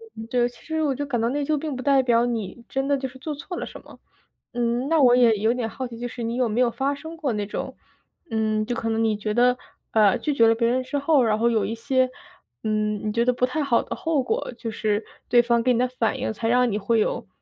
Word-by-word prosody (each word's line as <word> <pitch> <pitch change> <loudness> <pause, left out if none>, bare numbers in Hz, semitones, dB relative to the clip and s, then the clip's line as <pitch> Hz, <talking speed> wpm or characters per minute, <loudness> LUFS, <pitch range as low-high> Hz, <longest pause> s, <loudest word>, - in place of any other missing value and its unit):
嗯， 225 0 -8
对， 240 0 +2
其 245 - -19
实 320 -1 -2
我 285 -3 +1
就 285 - -3
感 245 -4 -1
到 225 - +1
内 290 +3 -1
疚 305 +2 0
并 300 -1 -4
不 255 - -5
代 275 -1 +4
表 235 -1 +3
你 235 -1 -4
真 270 +1 -1
的 285 - +3
就 265 -1 -3
是 260 - -14
做 300 +3 -4
错 325 +6 -7
了 - - -3
什 - - -10
么。 - - -16 0.5
嗯， 240 +2 0
那 325 -2 +3
我 245 -2 +6
也 235 -4 +5
有 220 +3 +2
点 245 -3 -2
好 260 +2 -5
奇， 235 - -10
就 245 - -3
是 240 - -8
你 230 +1 -2
有 250 -1 +1
没 225 +4 +1
有 245 - +4
发 270 +4 -1
生 320 +3 -9
过 290 -6 -1
那 210 -1 -2
种， 205 - -5 0.5
嗯， 215 -1 0
就 240 - -2
可 225 0 -2
能 225 0 0
你 220 -1 +2
觉 210 0 -3
得， 245 +2 +3 0.3
呃， 210 -3 +4
拒 300 - -1
绝 230 -4 +5
了 225 - +4
别 230 0 +1
人 255 +2 +1
之 270 +3 -3
后， 285 -1 +3
然 215 -2 +2
后 235 +1 +3
有 220 -4 +1
一 225 - -3
些， 255 +2 +1 0.5
嗯， 215 -1 -1
你 - - 0
觉 235 +1 +2
得 250 - +4
不 250 - +1
太 295 +4 -2
好 260 -4 +2
的 - - -5
后 320 -4 0
果？ 250 - -2
就 230 -2 -5
是 215 0 -1 0.2
对 240 0 +6
方 235 0 +2
给 255 - +3
你 - - +1
的 250 - +2
反 240 -3 -1
应， - - -2
才 225 +1 -3
让 250 +1 +3
你 205 - 0
会 225 +3 +1
有 215 - -1
240 Hz, 300 characters per minute, -24 LUFS, 225-265 Hz, 0.5 s, 我